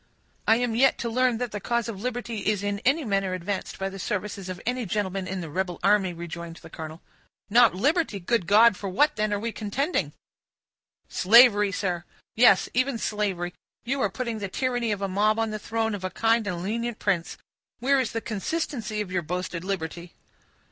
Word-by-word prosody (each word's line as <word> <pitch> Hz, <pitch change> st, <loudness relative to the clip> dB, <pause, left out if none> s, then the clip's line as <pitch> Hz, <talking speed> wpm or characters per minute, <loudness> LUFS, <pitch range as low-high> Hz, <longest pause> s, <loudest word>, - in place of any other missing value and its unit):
"I 225 Hz, -, +6 dB
am 240 Hz, -1 st, 0 dB
yet 265 Hz, +4 st, +4 dB
to 235 Hz, -, -3 dB
learn 250 Hz, 0 st, +2 dB
that 245 Hz, -1 st, -3 dB
the 205 Hz, -, -4 dB
cause 235 Hz, +3 st, -1 dB
of 205 Hz, -4 st, -6 dB
liberty 240 Hz, -2 st, -3 dB
is 210 Hz, -2 st, +1 dB
in 205 Hz, 0 st, -1 dB
any 275 Hz, +6 st, +1 dB
manner 195 Hz, -3 st, 0 dB
advanced 185 Hz, +2 st, -4 dB
by 195 Hz, -, -2 dB
the 195 Hz, 0 st, -7 dB
services 200 Hz, 0 st, -3 dB
of 185 Hz, -1 st, -5 dB
any 250 Hz, +1 st, -1 dB
gentleman 195 Hz, -1 st, -2 dB
in 190 Hz, -1 st, -3 dB
the 165 Hz, -, -6 dB
rebel 180 Hz, 0 st, -2 dB
army," 200 Hz, -2 st, +3 dB
rejoined 170 Hz, 0 st, -7 dB
the 165 Hz, -1 st, -13 dB
colonel. 160 Hz, +1 st, -8 dB, 0.5 s
"Not 235 Hz, -2 st, +6 dB
liberty! 285 Hz, -, +1 dB
Good 190 Hz, 0 st, 0 dB
God, 215 Hz, +2 st, +6 dB
for 195 Hz, +1 st, -5 dB
what 290 Hz, +11 st, +3 dB
then 215 Hz, 0 st, 0 dB
are 205 Hz, -, 0 dB
we 230 Hz, +2 st, -3 dB
contending?" 250 Hz, -, -2 dB, 0.9 s
"Slavery, 210 Hz, -1 st, +6 dB
sir; 180 Hz, -3 st, -2 dB, 0.3 s
yes, 220 Hz, -5 st, +6 dB
even 255 Hz, +1 st, +1 dB
slavery; 195 Hz, -5 st, -2 dB, 0.3 s
you 265 Hz, +3 st, -1 dB
are -, -, +2 dB
putting 235 Hz, -3 st, -4 dB
the 200 Hz, -, -3 dB
tyranny 245 Hz, +1 st, -1 dB
of 200 Hz, -1 st, -2 dB
a -, -, +1 dB
mob 210 Hz, +3 st, +2 dB
on 225 Hz, -1 st, 0 dB
the 215 Hz, -, -4 dB
throne 225 Hz, +1 st, -1 dB
of 200 Hz, -2 st, -5 dB
a 185 Hz, -, -1 dB
kind 225 Hz, +1 st, +1 dB
and 175 Hz, -3 st, -3 dB
lenient 230 Hz, +3 st, -2 dB
prince. 180 Hz, -5 st, -1 dB, 0.4 s
Where 275 Hz, +3 st, +2 dB
is 250 Hz, -4 st, -1 dB
the 225 Hz, -, -3 dB
consistency 225 Hz, -, -3 dB
of 195 Hz, -3 st, -5 dB
your 180 Hz, -1 st, 0 dB
boasted 180 Hz, +1 st, -4 dB
liberty?" 175 Hz, -2 st, -4 dB
210 Hz, 195 wpm, -26 LUFS, 185-235 Hz, 0.9 s, I